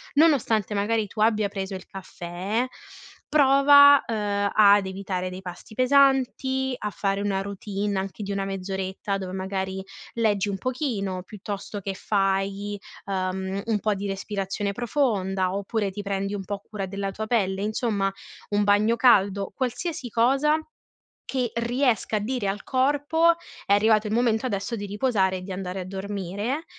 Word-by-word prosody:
nonostante 255 Hz, -, +3 dB
magari 210 Hz, +1 st, 0 dB
tu 215 Hz, -, -5 dB
abbia 215 Hz, -2 st, +3 dB
preso 195 Hz, -1 st, -5 dB
il 185 Hz, -, -8 dB
caffè, 190 Hz, +5 st, -4 dB, 0.6 s
prova, 285 Hz, 0 st, +7 dB
uhm, 205 Hz, -2 st, -1 dB
ad 205 Hz, -2 st, +6 dB
evitare 190 Hz, -1 st, -3 dB
dei 185 Hz, +1 st, -8 dB
pasti 180 Hz, +3 st, -9 dB
pesanti, 265 Hz, 0 st, +3 dB
a 210 Hz, -, -3 dB
fare 195 Hz, +1 st, -1 dB
una 195 Hz, -1 st, 0 dB
routine 200 Hz, 0 st, -3 dB
anche 195 Hz, +2 st, -4 dB
di 200 Hz, 0 st, -3 dB
una 195 Hz, 0 st, -1 dB
mezz'oretta 195 Hz, +1 st, -3 dB
dove, 185 Hz, -1 st, -5 dB
magari, 190 Hz, 0 st, -3 dB, 0.3 s
leggi 210 Hz, -3 st, +1 dB
un 195 Hz, -, -2 dB
pochino, 205 Hz, -7 st, -2 dB
piuttosto 205 Hz, +1 st, -6 dB
che 195 Hz, 0 st, -4 dB
fai, 195 Hz, +1 st, -1 dB, 0.3 s
uhm, 190 Hz, 0 st, -2 dB
un 215 Hz, -2 st, +1 dB
po' 215 Hz, 0 st, +1 dB
di 200 Hz, +1 st, -4 dB
respirazione 195 Hz, 0 st, -3 dB
profonda, 195 Hz, -7 st, 0 dB
oppure 200 Hz, 0 st, -1 dB
ti 205 Hz, -, -5 dB
prendi 200 Hz, 0 st, -2 dB
un 195 Hz, -, -4 dB
po' 205 Hz, 0 st, -4 dB
cura 200 Hz, -1 st, -6 dB
della 195 Hz, 0 st, -3 dB
tua 220 Hz, +2 st, -4 dB
pelle, 195 Hz, -4 st, +1 dB
insomma, 210 Hz, -2 st, 0 dB, 0.4 s
un 205 Hz, 0 st, +2 dB
bagno 210 Hz, +3 st, +3 dB
caldo, 200 Hz, -5 st, +3 dB
qualsiasi 260 Hz, +1 st, -3 dB
cosa 270 Hz, +7 st, +3 dB, 0.7 s
che 250 Hz, -3 st, -1 dB
riesca 235 Hz, -2 st, +1 dB
a -, -, 0 dB
dire 225 Hz, -2 st, -2 dB
al 205 Hz, +2 st, -3 dB
corpo: 290 Hz, +5 st, +3 dB, 0.3 s
è 200 Hz, -, +2 dB
arrivato 215 Hz, +1 st, +3 dB
il 210 Hz, -, -1 dB
momento 235 Hz, 0 st, +2 dB
adesso 205 Hz, +1 st, -2 dB
di 205 Hz, -1 st, -5 dB
riposare 200 Hz, -3 st, +1 dB
e 180 Hz, -, -9 dB
di 190 Hz, -, -6 dB
andare 185 Hz, 0 st, -4 dB
a -, -, -5 dB
dormire. 200 Hz, -, -4 dB
205 Hz, 155 wpm, -25 LUFS, 195-235 Hz, 0.7 s, prova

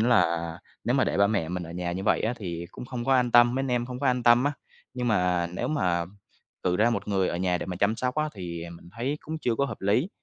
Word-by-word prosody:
là 85 Hz, -8 st, +2 dB, 0.3 s
nếu -, -, +1 dB
mà -, -, +3 dB
để -, -, -1 dB
ba 100 Hz, 0 st, +5 dB
mẹ 100 Hz, -6 st, 0 dB
mình 90 Hz, 0 st, -3 dB
ở 85 Hz, -, -8 dB
nhà 85 Hz, 0 st, -3 dB
như 95 Hz, +2 st, -4 dB
vậy -, -, +3 dB
á 115 Hz, -, 0 dB
thì 85 Hz, -5 st, -5 dB
cũng -, -, -8 dB
không 125 Hz, -1 st, -5 dB
có 135 Hz, 0 st, +3 dB
an 125 Hz, -2 st, +3 dB
tâm, 120 Hz, +1 st, +6 dB
mấy 135 Hz, -, 0 dB
anh 135 Hz, -, -2 dB
em 120 Hz, -1 st, 0 dB
không 125 Hz, +1 st, -6 dB
có 140 Hz, -, 0 dB
an 125 Hz, -1 st, +2 dB
tâm 120 Hz, +2 st, +6 dB
á. 145 Hz, -, +2 dB, 0.4 s
Nhưng 125 Hz, -1 st, -1 dB
mà 90 Hz, -4 st, +2 dB
nếu -, -, -2 dB
mà 90 Hz, -, +1 dB, 0.6 s
cử 90 Hz, 0 st, +1 dB
ra 115 Hz, +3 st, +4 dB
một 115 Hz, -, -2 dB
người 95 Hz, -2 st, +1 dB
ở -, -, -2 dB
nhà 90 Hz, 0 st, 0 dB
để -, -, -5 dB
mà 90 Hz, -2 st, -4 dB
chăm 105 Hz, +4 st, +1 dB
sóc 125 Hz, 0 st, -1 dB
á 155 Hz, 0 st, 0 dB
thì 85 Hz, -3 st, -6 dB
mình 85 Hz, 0 st, -12 dB
thấy 135 Hz, +6 st, -2 dB
cũng 160 Hz, +1 st, -5 dB
chưa 120 Hz, -6 st, 0 dB
có 140 Hz, -, +1 dB
hợp 120 Hz, -6 st, -6 dB
lý. 110 Hz, -, +2 dB
110 Hz, 285 wpm, -27 LUFS, 90-125 Hz, 0.6 s, tâm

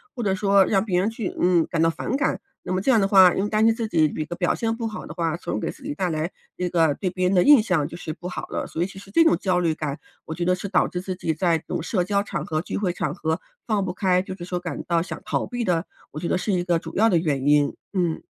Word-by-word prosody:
或 240 Hz, -, -3 dB
者 195 Hz, -3 st, +1 dB
说 195 Hz, 0 st, +4 dB
让 195 Hz, -1 st, +2 dB
别 185 Hz, -5 st, +1 dB
人 195 Hz, +4 st, +1 dB
去， 225 Hz, -3 st, -4 dB
嗯， 175 Hz, -2 st, +3 dB
感 165 Hz, -, 0 dB
到 165 Hz, -, +4 dB
反 210 Hz, -, -3 dB
感， 285 Hz, -, 0 dB, 0.2 s
那 -, -, -3 dB
么 185 Hz, -, 0 dB
这 235 Hz, -, 0 dB
样 245 Hz, -4 st, +5 dB
的 195 Hz, -, +2 dB
话， 190 Hz, -3 st, +7 dB
因 195 Hz, -, 0 dB
为 205 Hz, -, -1 dB
担 215 Hz, +1 st, +2 dB
心 225 Hz, 0 st, +4 dB
自 230 Hz, -1 st, -2 dB
己 160 Hz, -7 st, +3 dB
一 155 Hz, +1 st, -2 dB
个 175 Hz, -, -6 dB
表 175 Hz, 0 st, +1 dB
现 225 Hz, -1 st, -1 dB
不 230 Hz, -1 st, -3 dB
好 215 Hz, -, -6 dB
的 -, -, -8 dB
话， 165 Hz, -1 st, -1 dB
从 -, -, -4 dB
而 -, -, -1 dB
给 -, -, -3 dB
自 -, -, -10 dB
己 -, -, -3 dB
带 180 Hz, +4 st, -1 dB
来 160 Hz, +2 st, -2 dB, 0.2 s
一 180 Hz, -, -2 dB
个 165 Hz, -4 st, +2 dB
对 185 Hz, +3 st, -2 dB
别 185 Hz, 0 st, 0 dB
人 190 Hz, -, +1 dB
的 180 Hz, -, +5 dB
印 290 Hz, -5 st, +7 dB
象 180 Hz, -9 st, 0 dB
就 -, -, -9 dB
是 165 Hz, -, -5 dB
不 175 Hz, +2 st, -8 dB
好 180 Hz, -, -5 dB
了， -, -, -3 dB
所 160 Hz, -, -5 dB
以 175 Hz, -, +1 dB
其 195 Hz, -, -13 dB
实 195 Hz, 0 st, -12 dB
这 330 Hz, -, +5 dB
种 325 Hz, -, +4 dB
焦 185 Hz, -2 st, +1 dB
虑 165 Hz, -3 st, +1 dB
感， 150 Hz, -2 st, -4 dB, 0.3 s
我 160 Hz, -, -5 dB
觉 175 Hz, +2 st, -3 dB
得 180 Hz, +1 st, +3 dB
是 180 Hz, +2 st, -6 dB
导 180 Hz, -, +3 dB
致 180 Hz, -, -4 dB
自 185 Hz, 0 st, -4 dB
己 165 Hz, -3 st, -2 dB
在 165 Hz, +1 st, +2 dB
这 -, -, -24 dB
种 -, -, -3 dB
社 180 Hz, 0 st, 0 dB
交 200 Hz, +2 st, 0 dB
场 200 Hz, -, -4 dB
合、 155 Hz, -1 st, -1 dB
聚 -, -, -4 dB
会 195 Hz, -3 st, 0 dB
场 150 Hz, -4 st, -2 dB
合 160 Hz, -1 st, -2 dB, 0.3 s
放 210 Hz, -4 st, +1 dB
不 180 Hz, -, -3 dB
开， 185 Hz, -1 st, +2 dB
就 190 Hz, -, -6 dB
是 180 Hz, -, -9 dB
说 180 Hz, 0 st, -3 dB
感 175 Hz, -5 st, -5 dB
到 170 Hz, -1 st, +2 dB
想 -, -, -7 dB
逃 -, -, -1 dB
避 245 Hz, -1 st, -3 dB
的， 175 Hz, -3 st, 0 dB, 0.3 s
我 150 Hz, -, -6 dB
觉 170 Hz, -, -3 dB
得 -, -, +1 dB
是 185 Hz, +3 st, -2 dB
一 180 Hz, -1 st, +1 dB
个 175 Hz, -2 st, +1 dB
主 165 Hz, 0 st, -9 dB
要 225 Hz, +3 st, +4 dB
的 180 Hz, -, +3 dB
原 145 Hz, -5 st, -1 dB
因， 145 Hz, -1 st, +3 dB, 0.2 s
嗯。 175 Hz, -4 st, 0 dB
180 Hz, 340 characters per minute, -24 LUFS, 165-200 Hz, 0.3 s, 话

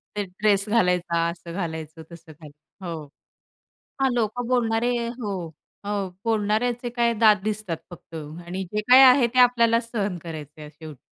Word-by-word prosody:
ते 205 Hz, -, -1 dB
ड्रेस 200 Hz, +2 st, 0 dB
घालायचा 180 Hz, -5 st, +1 dB
असं 170 Hz, 0 st, -9 dB
घालायचं, 160 Hz, -3 st, -5 dB
तसं 165 Hz, -1 st, -13 dB
घालायचं, 155 Hz, +4 st, -15 dB
हो. 160 Hz, -3 st, -5 dB, 1.0 s
हां. 265 Hz, -1 st, +3 dB
लोकं 235 Hz, +1 st, -1 dB
बोलणारे 240 Hz, -1 st, +1 dB, 0.3 s
हो, 205 Hz, -3 st, -3 dB, 0.5 s
हो. 200 Hz, -2 st, -2 dB, 0.2 s
बोलणाऱ्याचे 230 Hz, +3 st, 0 dB
काय 235 Hz, -1 st, +1 dB
दात 215 Hz, -1 st, +5 dB
दिसतात 210 Hz, -5 st, -3 dB
फक्त 170 Hz, -1 st, -14 dB
आणि 170 Hz, +5 st, -6 dB
जे 210 Hz, -, 0 dB
काही 260 Hz, +2 st, +9 dB
आहे 255 Hz, -1 st, +7 dB
ते -, -, +1 dB
आपल्याला 235 Hz, -2 st, +4 dB
सहन 205 Hz, -6 st, -3 dB
करायचं 155 Hz, -2 st, -9 dB
आहे 150 Hz, 0 st, -9 dB
शेवटी. 155 Hz, -3 st, -12 dB
200 Hz, 150 wpm, -24 LUFS, 165-230 Hz, 1.0 s, काही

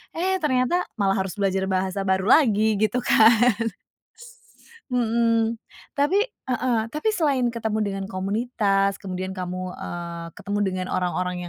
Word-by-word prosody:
Eh, 375 Hz, +3 st, 0 dB
ternyata 280 Hz, +5 st, +2 dB, 0.2 s
malah 195 Hz, -1 st, +2 dB
harus 190 Hz, -1 st, -2 dB
belajar 195 Hz, -1 st, 0 dB
bahasa 190 Hz, +1 st, -1 dB
baru 190 Hz, +2 st, +1 dB
lagi 220 Hz, -7 st, +4 dB
gitu 220 Hz, +4 st, +1 dB
kan. 220 Hz, -2 st, +6 dB, 1.4 s
S -, -, -21 dB, 0.2 s
mhm, 230 Hz, -1 st, +1 dB, 0.4 s
tapi 295 Hz, +8 st, +3 dB
heeh, 250 Hz, -, -2 dB
tapi 305 Hz, +9 st, -1 dB
selain 280 Hz, -9 st, +1 dB
ketemu 220 Hz, -2 st, -2 dB
dengan 195 Hz, -1 st, -3 dB
komunitas 200 Hz, 0 st, 0 dB
kemudian 185 Hz, -1 st, -4 dB
kamu, 185 Hz, 0 st, -5 dB
eee, 170 Hz, -1 st, -6 dB
ketemu 205 Hz, 0 st, -3 dB
dengan 185 Hz, -1 st, -2 dB
orang-orang 180 Hz, 0 st, -1 dB
205 Hz, 130 wpm, -24 LUFS, 190-250 Hz, 1.4 s, kan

